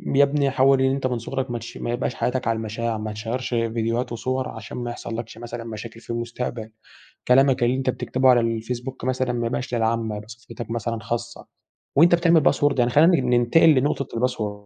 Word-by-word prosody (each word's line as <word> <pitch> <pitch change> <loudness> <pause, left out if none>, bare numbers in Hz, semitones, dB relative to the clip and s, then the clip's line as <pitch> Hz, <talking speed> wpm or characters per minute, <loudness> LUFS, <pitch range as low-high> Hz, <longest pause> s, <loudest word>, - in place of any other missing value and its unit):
يا 140 - +7
ابني 140 0 +2
حاول 135 0 +4
إن 130 0 +3
أنت 130 -1 -1
من 125 -2 -2
صغرك 130 +1 -4
ماتشي 120 - -6
ما 120 - -3
يبقاش 120 +1 -2
حياتك 125 -1 -1
على 115 - +2
المشاع، 110 +1 -3
ما 105 0 -5
تشيَّرش 115 +4 -4
فيديوهات 115 0 -1
وصور 130 +2 -2
عشان 110 -1 -8
ما 120 -1 -3
يحصلكش 115 -1 -6
مثلًا 120 0 -7
مشاكل 115 0 -8
في - - -21
المستقبل. 120 -1 -4 0.6
كلامك 130 0 +4
اللي 125 +2 +2
أنت 130 -1 -1
بتكتبه 130 +1 +1
على 125 -1 +6
الفيسبوك 120 +3 -4
مثلًا 130 -1 0
ما 120 -1 -1
يبقاش 125 +1 -4
للعامة، 115 -1 0
يبقي 105 +1 -10
صفحتك 115 0 -9
مثلًا 115 0 -2
خاصة. 120 +2 -5 0.5
وأنت 170 +3 +7
بتعمل 170 -2 +4
باسورد 145 -2 +2
يعني 120 0 +2
خلِّينا 165 +6 +6
نن 125 -2 -1
ننتقل 120 +7 +5
لنقطة 140 -2 +1
الباسورد. 110 -4 -2
120 Hz, 190 wpm, -23 LUFS, 115-130 Hz, 0.6 s, يا